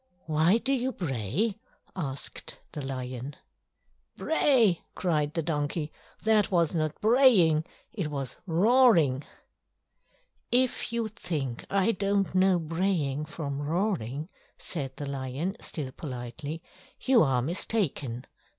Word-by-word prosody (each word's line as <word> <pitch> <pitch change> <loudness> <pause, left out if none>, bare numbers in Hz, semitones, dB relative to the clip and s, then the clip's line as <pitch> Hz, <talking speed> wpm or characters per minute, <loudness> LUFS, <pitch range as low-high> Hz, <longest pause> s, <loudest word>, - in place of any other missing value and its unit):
"Why 160 +6 +4
do 265 +4 0
you 260 0 0
bray?" 165 - -1 0.4
asked 140 -7 -5
the 150 - -5
lion. 130 0 -5 0.8
"Bray!" 250 - +3
cried 150 -4 0
the 165 - 0
donkey. 150 0 -2 0.3
"That 215 -2 +4
was 170 -4 +2
not 155 -2 -1
braying—it 210 - +3
was 140 -3 -4
roaring!" 175 - +4 1.3
"If 250 -1 +1
you 235 -1 -1
think 155 - -4
I 195 +2 +3
don't 200 -1 0
know 185 0 +4
braying 165 -4 -1
from 145 -2 -4
roaring," 155 - -1 0.3
said 135 -6 -4
the 145 - -4
lion, 140 +7 -3
still 140 -5 -4
politely, 140 +4 -6 0.4
"you 255 -3 +5
are 130 -4 +2
mistaken. 145 - -1
160 Hz, 110 wpm, -28 LUFS, 140-200 Hz, 1.3 s, you